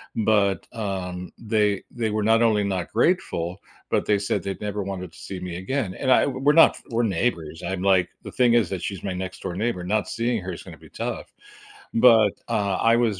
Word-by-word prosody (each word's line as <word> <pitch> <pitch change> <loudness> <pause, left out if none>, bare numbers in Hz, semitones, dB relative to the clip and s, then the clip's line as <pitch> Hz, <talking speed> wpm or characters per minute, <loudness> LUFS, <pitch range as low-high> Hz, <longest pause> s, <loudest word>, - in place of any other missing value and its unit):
but, 100 -4 +2
um, 90 -4 -4
they 105 -3 +1
they 115 -3 -2
were 110 0 0
not 115 +2 +4
only 110 -3 +3
not 95 -3 -2
grateful, 100 - 0 0.3
but - - +1
they 105 -1 +2
said 100 -2 -1
they'd 100 +1 -5
never 105 -1 -3
wanted 95 -3 -5
to - - -17
see 95 - -7
me 90 -1 -6
again, 95 +1 -2
and 130 -1 0
I - - +5
w 130 -2 -3
we're 145 +2 +4
not 165 +1 +6
we're 115 - +1
neighbors, 85 -6 -1
I'm 95 -1 -3
like 95 -2 +3
the - - -8
thing 125 -2 +3
is 115 -7 +3
that 95 -3 -4
she's 100 -2 -5
my 95 - -2
next 95 0 -5
door 90 -2 -4
neighbor, 105 -3 -2
not 100 +1 0
seeing 115 +1 -1
her 90 0 -4
is - - -8
gonna - - -11
be - - -17
tough. - - -5 0.6
But, 115 -4 +6 0.2
uh, 100 -4 0
I 115 0 +5
was 110 -6 +1
100 Hz, 220 wpm, -24 LUFS, 95-115 Hz, 0.6 s, not